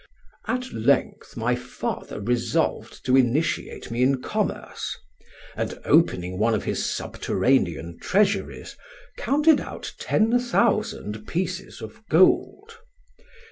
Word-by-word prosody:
"At 255 Hz, 0 st, -2 dB
length 110 Hz, -, 0 dB
my -, -, +1 dB
father -, -, -5 dB
resolved 120 Hz, +3 st, -1 dB
to 130 Hz, -, +4 dB
initiate 135 Hz, +3 st, 0 dB
me 120 Hz, +1 st, -1 dB
in 130 Hz, +1 st, +3 dB
commerce; -, -, -3 dB, 0.6 s
and, -, -, -3 dB
opening 90 Hz, +1 st, +2 dB
one 110 Hz, +1 st, +3 dB
of 105 Hz, -, -2 dB
his -, -, -2 dB
subterranean 85 Hz, -10 st, 0 dB
treasuries, 200 Hz, +2 st, 0 dB, 0.4 s
counted 295 Hz, +2 st, +3 dB
out -, -, -7 dB
ten 225 Hz, +3 st, +2 dB
thousand 215 Hz, -, 0 dB
pieces 185 Hz, +2 st, -3 dB
of 230 Hz, -, -10 dB
gold. 400 Hz, -, +3 dB
155 Hz, 105 wpm, -24 LUFS, -, 0.6 s, to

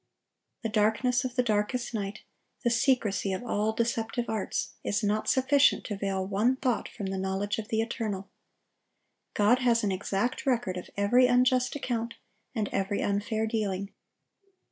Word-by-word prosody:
The 225 Hz, -, -1 dB
darkness 220 Hz, +4 st, +2 dB
of 250 Hz, -1 st, -4 dB
the 250 Hz, -, +3 dB
darkest 225 Hz, +3 st, 0 dB
night, 200 Hz, -2 st, -4 dB, 0.4 s
the 240 Hz, -, +2 dB
secrecy 230 Hz, -6 st, +2 dB
of 190 Hz, -, -4 dB
all 215 Hz, -1 st, 0 dB
deceptive 230 Hz, +1 st, -1 dB
arts, 220 Hz, -3 st, -2 dB
is 210 Hz, +2 st, -1 dB
not 210 Hz, +1 st, +1 dB
sufficient 270 Hz, +2 st, +4 dB
to 210 Hz, -, -4 dB
veil 195 Hz, -1 st, -2 dB
one 210 Hz, +7 st, +2 dB
thought 255 Hz, -3 st, -1 dB
from 200 Hz, -, -6 dB
the 190 Hz, 0 st, -2 dB
knowledge 190 Hz, +3 st, -1 dB
of 215 Hz, -, -5 dB
the 220 Hz, 0 st, +1 dB
Eternal. 215 Hz, -4 st, -3 dB, 1.1 s
God 215 Hz, +5 st, +4 dB
has 240 Hz, -2 st, +3 dB
an 200 Hz, -, +1 dB
exact 200 Hz, +7 st, -2 dB
record 240 Hz, -8 st, +1 dB
of 180 Hz, -, -7 dB
every 245 Hz, +5 st, +5 dB
unjust 250 Hz, +1 st, +3 dB
account 235 Hz, -4 st, -2 dB, 0.4 s
and 215 Hz, -3 st, 0 dB
every 195 Hz, +1 st, -1 dB
unfair 210 Hz, +2 st, 0 dB
dealing. 200 Hz, -3 st, -2 dB
220 Hz, 155 wpm, -28 LUFS, 200-245 Hz, 1.1 s, every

